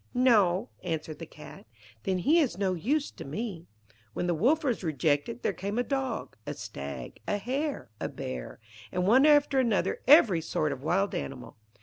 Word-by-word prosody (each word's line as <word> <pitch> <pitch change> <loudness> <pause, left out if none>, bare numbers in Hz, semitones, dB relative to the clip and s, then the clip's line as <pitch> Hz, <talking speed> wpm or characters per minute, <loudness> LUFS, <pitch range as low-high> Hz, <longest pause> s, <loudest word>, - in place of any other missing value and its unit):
'No,' 220 -5 +4
answered 160 -3 -4
the 165 - -7
Cat. 150 - -13 0.4
'Then 190 -1 +1
he 295 - +4
is 265 - +1
no 190 -2 +1
use 275 - 0
to - - -9
me.' 175 +3 -5 0.5
When - - -2
the 175 - +1
Wolf 265 - +2
was 245 -8 -1
rejected, 145 -6 0
there - - +1
came 200 +3 -4
a 245 - +2
Dog, 270 0 -3
a - - -3
Stag, - - -7
a 205 - +1
Hare, 255 - -3
a - - -3
Bear, 65 -2 -6 0.3
and 180 0 0
one 260 +9 +6
after 290 -2 +5
another 230 -6 +1
every 235 - +7
sort 155 -1 -1
of 135 -2 -5
wild 190 +7 +1
animal. 135 -2 -5
195 Hz, 180 wpm, -29 LUFS, 160-260 Hz, 0.5 s, every